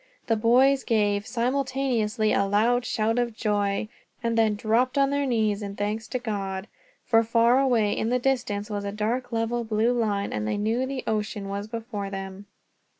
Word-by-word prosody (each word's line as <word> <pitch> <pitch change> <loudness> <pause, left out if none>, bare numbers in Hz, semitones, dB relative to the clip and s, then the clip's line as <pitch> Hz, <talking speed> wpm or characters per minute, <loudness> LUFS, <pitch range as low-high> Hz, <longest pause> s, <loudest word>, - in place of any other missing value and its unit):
The 225 - +2
boys 255 +5 +4
gave, 205 -3 +1
simultaneously, 245 -3 0
a 200 - +2
loud 235 +5 +2
shout 225 +2 0
of 235 -2 -1
joy; 205 -1 0 0.4
and 230 0 0
then 220 -2 +3
dropped 235 +6 +1
on 275 0 +3
their 285 0 0
knees, 220 -4 +1
in 200 -1 -5
thanks 210 +2 -3
to 255 - -2
God, 200 -4 -4 0.4
for 225 -2 +4
far 230 +2 +3
away 235 -6 +2
in 220 - -1
the 250 - +2
distance 240 -6 -1
was 205 -1 -4
a 200 - -3
dark 230 +5 -2
level 230 +1 -1
blue 220 +2 +1
line, 210 -4 -1
and 105 0 -2
they 110 - -1
knew 225 +5 0
the 270 -1 -4
ocean 210 -2 -2
was 200 +1 -4
before 220 -3 -5
them. 195 0 -7
220 Hz, 180 wpm, -26 LUFS, 205-245 Hz, 0.4 s, boys